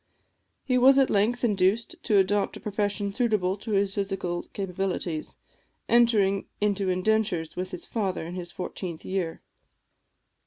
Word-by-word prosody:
He 255 -2 +2
was 265 +2 +7
at 270 -1 +4
length 220 +5 +1
induced 205 0 +2
to 210 - +2
adopt 200 +1 +2
a - - -11
profession 205 -1 -1
suitable 210 -6 +1
to 215 +1 -5
his 195 -1 +2
physical 195 -3 -2
capabilities, 185 -4 -3 0.5
entering 215 -5 +3
into 200 -2 +1
indentures 185 -3 0
with 185 +1 -3
his 180 - -7
father 195 -7 -2
in 170 - -6
his 180 -1 -6
fourteenth 180 -2 -6
year. 185 -4 -3
195 Hz, 140 wpm, -27 LUFS, 185-215 Hz, 0.5 s, was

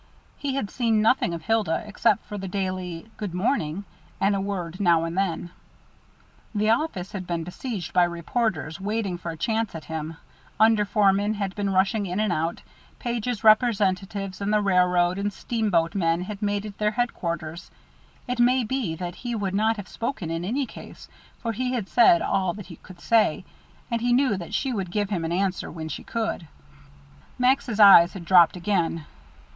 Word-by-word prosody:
He 275 -2 -3
had 210 -8 -2
seen 225 -4 +1
nothing 220 -5 +3
of 170 -1 -5
Hilda, 220 -7 0
except 210 +1 +1
for 210 - -7
the 195 -1 -5
daily 185 0 -4
"Good 200 -5 -5
morning," 190 - -1 0.3
and 200 +1 +2
a 195 - -1
word 185 -3 -4
now 170 -4 +3
and 165 +1 -3
then. 180 -3 -1 1.0
The 215 +1 +2
office 225 - -1
had 185 -3 -6
been 170 -1 -2
besieged 185 +2 -6
by 180 -1 +5
reporters 170 -1 -2
waiting 200 -3 -2
for 170 - -5
a 165 - -6
chance 220 +2 -1
at 160 - -7
him; 160 0 -5 0.4
under 220 -1 +5
foremen 205 +1 +2
had 200 -2 -3
been 205 -1 -2
rushing 195 +2 +1
in 180 +3 -2
and 215 -4 +1
out; 165 +1 -2 0.3
Page's 240 -1 -3
representatives 200 -3 +2
and 200 +1 -1
the 210 - +4
railroad 180 -1 +3
and 205 +1 -1
steamboat 200 -7 0
men 170 -3 +1
had 200 +2 -6
made 205 0 -1
it 210 -1 -9
their 210 0 +2
headquarters. 170 -8 -3 0.6
It 250 0 -3
may 250 +1 +4
be 225 -8 -2
that 175 +1 -5
he 240 -2 -4
would 200 -3 -2
not 220 +3 +2
have 205 - -7
spoken 230 -9 -4
in 165 +1 -3
any 255 +9 -1
case, - - -12 0.3
for 230 - -3
he 250 +3 -2
had 225 -6 -2
said 210 -8 +5
all 185 -3 0
that 205 -2 -8
he 170 -2 -11
could 185 -2 -15
say, 225 -2 +2 0.5
and 230 -1 0
he 245 0 +2
knew 255 -4 +3
that 175 -3 -5
she 265 -2 -1
would 195 -5 -3
give 205 +2 -2
him 175 -5 -1
an 165 - -2
answer 190 +1 -1
when 160 -1 -6
she - - -6
could. 220 -7 -3 0.9
Max's 250 -3 +1
eyes 190 -4 +8
had 180 -4 -8
dropped 175 -1 +6
again. 170 -4 -1
195 Hz, 185 wpm, -25 LUFS, 175-220 Hz, 1.0 s, eyes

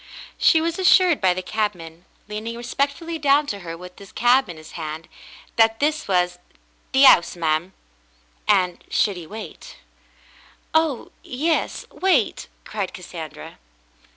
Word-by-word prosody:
She 320 - +5
was 335 +2 -2
assured 365 -3 +5
by 185 -2 +3
the 185 - -4
cabman, 180 -6 -4 0.2
leaning 215 +2 -5
respectfully 280 +7 -2
down 290 0 +3
to 205 -7 -4
her 165 -3 -7
with 180 +1 -12
his 200 - -13
cap 245 0 +3
in 170 - -8
his 155 0 -13
hand, 155 -1 -6 0.5
that 225 0 +4
this 305 +2 0
was 180 -2 +1 0.5
"the 270 +1 +6
'ouse, 175 -10 +6
ma'm," 165 +2 -1 0.7
and 180 -1 +2
should 205 -3 +1
he 170 -3 -9
wait? 215 +3 -9 1.0
"Oh, 315 -5 +1
yes. 310 +6 -1
Wait," 345 - +1 0.2
cried - - -4
Cassandra. - - -9
220 Hz, 135 wpm, -22 LUFS, 180-285 Hz, 1.0 s, the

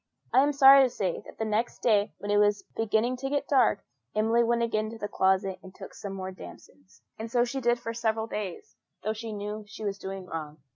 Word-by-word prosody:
I 260 - +7
am 290 +1 +3
sorry 275 -1 +8
to 260 - +4
say 190 -6 -2
that - - -13
the 220 - -2
next 220 +2 -2
day, 210 -3 +3
when 205 - -4
it 205 - +3
was 205 0 +3
beginning 225 +3 +1
to 270 +2 -4
get 285 0 -1
dark, 250 -7 +3 0.3
Emily 225 +2 +3
went 235 0 +1
again 215 -2 -1
to 225 - -8
the 205 - -4
closet 190 -1 +1
and 190 0 -13
took - - -10
some 200 -1 -7
more 190 -1 -5
damsons; 95 - -14 0.2
and 225 +1 -6
so 240 -1 +3
she 265 +2 -4
did 240 0 +2
for 230 -1 -5
several 220 -1 -1
days, 210 -5 -6 0.3
though 215 +2 0
she 220 +1 -6
knew 210 +1 -5
she 210 +1 -8
was 200 -1 -3
doing 190 -1 -6
wrong. 155 -3 -6
215 Hz, 230 wpm, -28 LUFS, 195-235 Hz, 0.3 s, sorry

